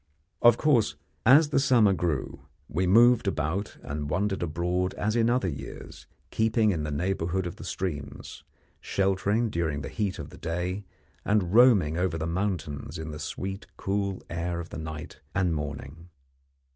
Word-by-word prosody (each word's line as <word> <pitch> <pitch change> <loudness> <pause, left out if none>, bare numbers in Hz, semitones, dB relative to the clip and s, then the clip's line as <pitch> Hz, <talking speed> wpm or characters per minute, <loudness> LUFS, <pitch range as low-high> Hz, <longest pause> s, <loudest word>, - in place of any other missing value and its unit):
Of 120 -1 +7
course, 135 -9 +3 0.3
as 145 +4 +7
the 140 - +2
summer 120 -7 +4
grew, 80 -7 -2 0.3
we 90 +4 -1
moved 115 +3 +6
about 90 +3 -2
and 75 0 -4
wandered 95 +5 0
abroad 90 +3 -1
as 110 +2 -1
in 115 0 +3
other 120 -5 +1
years, 70 -5 -8 0.2
keeping 110 -1 +2
in 85 -5 -1
the 75 - -3
neighbourhood 90 +3 -1
of 85 - -5
the - - -9
streams, 75 -7 -5 0.4
sheltering 100 +4 0
during 80 -5 -1
the - - -5
heat 105 -4 -2
of - - -8
the - - -13
day, 90 +4 -3 0.4
and 100 -3 +1
roaming 105 -10 +5
over 90 -2 0
the 80 - -2
mountains 85 -4 -3
in 80 0 -5
the 75 - -7
sweet 95 +8 -5
cool 100 -1 -2
air 85 +1 -3
of 85 - -7
the - - -6
night 80 -1 -7 0.2
and 90 -3 +2
morning. 75 +2 -6
90 Hz, 160 wpm, -27 LUFS, 80-105 Hz, 0.4 s, Of